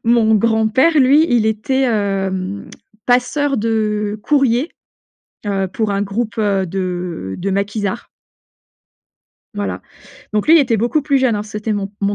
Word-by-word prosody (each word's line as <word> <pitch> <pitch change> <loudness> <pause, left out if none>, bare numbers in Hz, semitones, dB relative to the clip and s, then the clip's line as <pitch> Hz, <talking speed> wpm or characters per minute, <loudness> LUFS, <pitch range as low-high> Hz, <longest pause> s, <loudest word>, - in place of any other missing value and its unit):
mon 230 -1 +3
grand-père 225 +8 +3
lui 285 +4 +5
il 230 -3 +3
était, 220 +5 0
hem, 195 -4 -2 0.4
passeur 255 +3 +1
de 210 -1 -1
courrier, 275 +1 +1 0.8
heu, 195 -2 -1
pour 210 +3 -2
un 200 0 -1
groupe, 215 +3 -3
heu, 200 -3 +1
de 180 - -4
de 195 +2 -3
maquisards. 205 +3 -2 1.5
Voilà, 205 0 -4 0.5
donc 210 -1 0
lui 320 - +7
il 330 - +7
était 245 -5 +1
beaucoup 240 +7 0
plus 280 -2 +2
jeune, 255 -4 +2
hein, 205 - -2
c'était 210 +1 -4
mon 200 -1 -3
mon 200 0 0
215 Hz, 145 wpm, -18 LUFS, 200-245 Hz, 1.5 s, lui